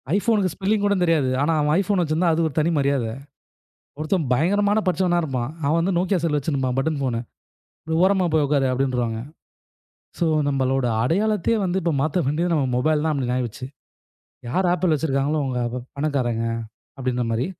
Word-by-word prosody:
ஐபோன்க்கு 205 -4 +1
spelling 200 +2 0
கூடங் 200 -3 +2
தெரியாது. 155 -6 +2
ஆனா 155 +3 +2
அவன் 150 +1 +2
ஐபோன் 195 -1 +1
வச்சுருந்தா 165 +2 +1
அது 165 0 +1
ஒரு 150 - -6
தனி 155 - +2
மரியாதை. 140 -5 0 0.9
ஒருத்தன் 155 0 -1
பயங்கரமான 205 - +2
படிச்சவனா 180 -1 +2
இருப்பான். 130 -3 -3
அவன் 155 +4 +2
வந்து 180 +2 0
நோக்கியா 190 +1 +1
செல் 155 -3 +1
வச்சுன்ருப்பான் 135 -3 -1
பட்டன் 150 +1 0
போனு. 115 -3 -1 0.9
ஓரமா 190 -2 +2
போய் 155 -2 +3
உக்காரு, 140 -2 +2
அப்படின்ருவாங்க. 125 -3 -1 1.0
சோ 170 - +1 0.2
நம்மளோட 135 -1 +1 0.2
அடையாளத்தையே 210 - +1
வந்து 185 +1 0
இப்ப 170 - 0
மாத்த 155 +4 0
வேண்டியது 170 +5 0
நம்ம 140 -4 +1
மொபைல் 150 +3 +1
தான் 160 - +1
அப்படி 125 -3 -1
ஆகிருச்சு. 125 0 -4 0.8
யார் 185 +8 +1
ஆப்பிள் 180 -2 +1
வச்சுருக்காங்களோ 145 0 0
அவுங்க 125 -2 -2
அப்ப 125 +2 -5 0.2
பணக்காரங்க, 130 -6 -1 0.5
அப்படிங்க 125 -2 -1
மாரி. 120 +5 0
150 Hz, 160 wpm, -23 LUFS, 130-180 Hz, 1.0 s, போய்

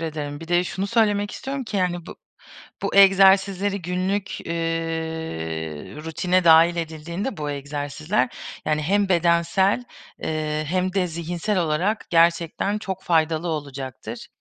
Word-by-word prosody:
ederim. 150 -2 -4
Bir 165 - -9
de 175 0 +3
şunu 190 +2 -3
söylemek 205 -2 +2
istiyorum 270 0 -5
ki 215 -2 -4
yani 175 -2 -1
bu - - -9 0.7
bu - - -2
egzersizleri 195 0 +5
günlük, 185 +3 -2
eee, 170 - -2 1.5
rutine 180 +3 +1
dâhil 165 +1 +6
edildiğinde 170 +7 -4
bu 150 -1 -3
egzersizler, 145 - -2 0.4
yani 155 0 0
hem 200 +4 +2
bedensel, 175 +5 +2 0.4
eee, 155 -1 -2
hem 185 +1 0
de 190 -2 +1
zihinsel 170 +4 -2
olarak 175 +6 0
gerçekten 170 +4 +2
çok 190 -2 -5
faydalı 160 0 +1
olacaktır. 140 -5 -6
175 Hz, 125 wpm, -23 LUFS, 160-195 Hz, 1.5 s, dâhil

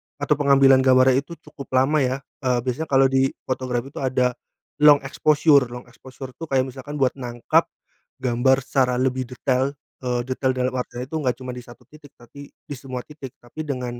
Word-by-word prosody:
atau 145 +1 0
pengambilan 135 -2 +5
gambarnya 130 0 +4
itu 170 +4 -9
cukup 140 - -12
lama 135 +4 +3
ya, 130 +1 -1 0.2
eee, 125 -1 +2
biasanya 130 +5 -3
kalau 135 -1 +3
di 135 0 +3 0.2
fotografi 130 0 -3
itu - - -8
ada 130 -2 +1 0.5
long 145 -1 +6
exposure. 145 -1 +3
Long 125 +1 -9
exposure 130 +1 -11
tuh 165 - -6
kayak 135 -2 +2
misalkan 140 +3 -9
buat 135 -3 +2
nangkep 120 -1 0 0.6
gambar 130 +2 +2
secara 130 -1 +1
lebih 130 0 -1
detail, 130 +2 -1 0.2
eee, 125 -1 -2
detail 130 +1 -1
dalam 125 0 0
artian 125 -1 -5
itu 135 +5 -7
enggak 130 -4 0
cuma 130 -1 -7
di 125 - -7
1 120 0 -15
titik 150 -2 -17
tapi 140 +4 -13
di 145 - -10
semua 130 -1 -7
titik, 145 -4 -11
tapi 155 +6 -8
dengan, 125 -3 -4
130 Hz, 185 wpm, -22 LUFS, 125-140 Hz, 0.6 s, long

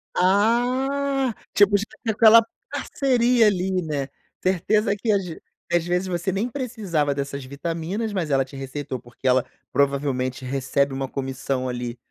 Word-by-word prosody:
Ah, 255 +7 +2 0.2
tipo 205 0 +5 0.3
aquela 225 +1 +7 0.2
parceria 245 -4 +2
ali, 185 -2 +1
né, 145 -4 -3 0.3
certeza 200 +3 +2
que 220 +2 -4 0.6
às 175 -1 +2
vezes 180 +2 0
você 175 +1 -1
nem 215 +6 -1
precisava 205 - -1
dessas 140 -1 -4
vitaminas, 170 - -3
mas 185 -6 -2
ela 135 -1 +3
te 135 +2 -13
receitou 135 -1 -5
porque 120 +2 -17
ela 130 0 +4 0.3
provavelmente 135 -2 0
recebe 135 +1 0
uma 135 0 -2
comissão 130 -1 -3
ali 120 -1 -4
175 Hz, 130 wpm, -23 LUFS, 135-220 Hz, 0.6 s, aquela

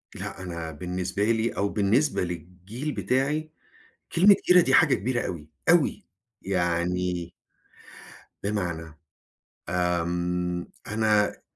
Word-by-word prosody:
لا 95 - -6
أنا 85 -2 -5
بالنسبة 90 +5 -3
لي 115 +1 +2
أو 100 0 -1
بالنسبة 110 +4 +2
للجيل 90 - -6
بتاعي، 150 +4 0 0.6
كلمة 195 +4 +7
جيرة 180 0 +8
دي 135 -6 +2
حاجة 135 - +6
كبيرة 125 +2 -1
أوي، 80 -4 -6 0.2
أوي - - +3 0.4
يعني 90 -1 -1 1.1
بمعنى 85 -6 -3 0.8
آمم، 90 0 -1 0.2
أنا 105 -1 +1
90 Hz, 100 wpm, -26 LUFS, 85-115 Hz, 1.1 s, جيرة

